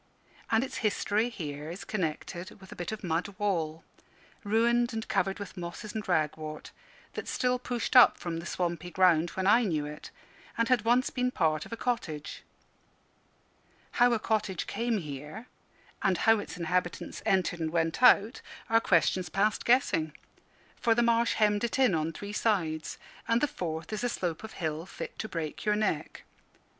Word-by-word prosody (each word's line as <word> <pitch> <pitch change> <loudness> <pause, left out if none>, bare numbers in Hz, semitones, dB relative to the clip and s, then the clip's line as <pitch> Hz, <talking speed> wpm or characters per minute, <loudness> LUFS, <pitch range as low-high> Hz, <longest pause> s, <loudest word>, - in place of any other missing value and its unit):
And 225 +2 +3
its 265 - -5
history 215 +1 +1
here 150 -8 -6
is 175 +4 -7
connected 175 -1 -4
with 190 -1 -14
a - - -8
bit 175 +1 -4
of 220 -1 -6
mud 175 +3 -2
wall, 165 -6 -1 0.6
ruined 235 +3 +2
and 220 0 -4
covered 195 0 0
with 200 -2 -8
mosses 180 +4 -6
and 215 -1 -4
ragwort, 155 -2 -2 0.4
that - - -6
still 250 0 0
pushed 245 0 -3
up 250 - +8
from 170 -2 -4
the 170 +1 -6
swampy 175 -1 -2
ground 175 -2 +4
when 190 - 0
I 210 +5 +6
knew 160 -10 0
it, 150 +1 -8 0.5
and 230 0 +1
had 245 -4 +3
once 245 +3 +3
been 250 -1 0
part 155 -9 0
of - - -19
a 230 - -4
cottage. 160 -13 -3 1.5
How 245 0 +4
a - - +3
cottage 210 -5 -1
came 230 +2 -1
here, 150 - -7 0.6
and 190 -2 +2
how 225 +2 +4
its 205 - -7
inhabitants 175 +1 -2
entered 185 -2 +1
and 160 -1 -1
went 165 +4 0
out, 230 -1 +5 0.3
are 225 0 +5
questions 180 -1 +2
past 200 +5 +1
guessing; 165 - +2 0.6
for 230 -1 +2
the 240 - +3
marsh 235 0 +3
hemmed 210 -1 +2
it 235 - -1
in 260 -7 +4
on 160 0 0
three 200 +5 -7
sides, 165 -9 0 0.3
and 230 0 +3
the 295 - +2
fourth 165 - -5
is 215 - -3
a 245 - +1
slope 175 -6 -3
of 220 - -8
hill 160 0 -3
fit - - -8
to 220 - -4
break 160 -3 -4
your 210 -1 +2
neck. 210 -8 -2
195 Hz, 175 wpm, -29 LUFS, 165-225 Hz, 1.5 s, up